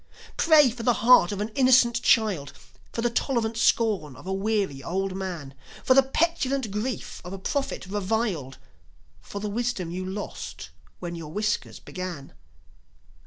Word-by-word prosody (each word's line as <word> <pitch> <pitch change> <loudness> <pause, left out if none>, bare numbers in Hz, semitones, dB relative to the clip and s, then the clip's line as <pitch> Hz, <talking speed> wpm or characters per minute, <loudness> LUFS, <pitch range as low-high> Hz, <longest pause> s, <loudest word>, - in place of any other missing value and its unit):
Pray 305 -6 +6
for 235 +1 -8
the 240 +1 +3
heart 240 -8 +7
of 205 0 -3
an 210 - -2
innocent 245 -1 +4
child, 195 -11 +2 0.4
For 230 - -3
the 240 - +3
tolerant 235 -2 0
scorn 215 - +1
of - - -14
a 190 - -2
weary 195 -8 -1
old 190 +4 -2
man, 175 -8 -5 0.3
For 260 - +5
the 270 - +7
petulant 270 -4 0
grief 215 +4 -4
of 180 +1 -7
a - - -5
prophet 270 +6 -3
reviled, 195 - -2 0.6
For 200 - -8
the 210 - -3
wisdom 215 -5 -2
you 185 +2 -4
lost 190 - -6 0.3
when 175 -1 -6
your 165 -3 -7
whiskers 215 +5 -2
began. 180 -7 -7
210 Hz, 155 wpm, -26 LUFS, 185-240 Hz, 0.6 s, heart